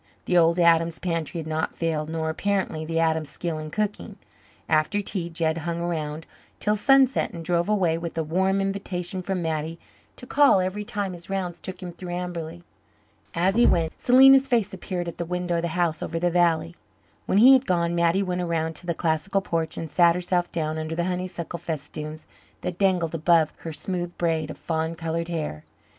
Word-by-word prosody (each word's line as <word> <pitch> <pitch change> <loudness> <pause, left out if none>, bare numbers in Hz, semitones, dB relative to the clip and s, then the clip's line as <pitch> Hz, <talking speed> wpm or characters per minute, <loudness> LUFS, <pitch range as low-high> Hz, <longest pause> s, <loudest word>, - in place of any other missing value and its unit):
The 180 - 0
old 170 0 +5
Adams 165 -1 +4
pantry 165 -2 -3
had 160 - -5
not 160 0 -2
failed, 160 -2 -2
nor 160 -1 -2
apparently 190 -2 -1
the 165 +1 -3
Adams 160 -2 +1
skill 165 +1 -4
in 155 0 -6
cooking. 210 +4 -3 0.5
After 155 +6 +2
tea 190 -4 -3
Jed 165 -1 -1
hung 170 +1 -3
around 160 -2 -3 0.3
till 210 0 +1
sunset 270 +3 +4
and 165 -1 -7
drove 175 +1 +1
away 180 -6 +2
with 165 -1 -6
a 160 - +1
warm 190 +5 +1
invitation 190 -2 -3
from 185 -1 -2
Mattie 160 0 -2 0.4
to - - -10
call 280 -5 +5
every 185 +3 -2
time 205 -2 -3
his 175 +1 -11
rounds 180 -3 -3
took 185 0 -8
him 180 - -5
through 175 0 -7
Amberley. 170 -1 -5 0.7
As 185 +4 +2
he 240 - +5
went, 165 -2 +2
Selena's 270 +2 +7
face 235 -8 +1
appeared 180 -2 -4
at 170 - -7
the - - 0
window 180 0 -2
of - - 0
the 170 - -1
house 170 -3 +1
over 165 - -3
the 175 +1 +1
valley. 165 - +2 0.5
When - - +2
he 250 +6 +9
had 265 0 +3
gone 170 -1 +1
Mattie 170 +3 +2
went 180 -1 -2
around 165 -2 -1
to 180 - -10
the 170 - 0
classical 170 +5 0
porch 165 -3 -2
and 160 -3 -5
sat 170 +1 +5
herself 180 0 -1
down 155 -1 -2
under 155 +1 -4
the 170 - 0
honeysuckle 180 -1 -4
festoons 155 0 -6 0.4
that 180 - -4
dangled 180 -5 +2
above 165 -1 +3
her 165 - -7
smooth 175 +2 -4
braids 160 -3 0
of - - -7
fawn 160 0 -2
coloured 165 0 -3
hair. 155 - -4
170 Hz, 195 wpm, -25 LUFS, 160-185 Hz, 0.7 s, he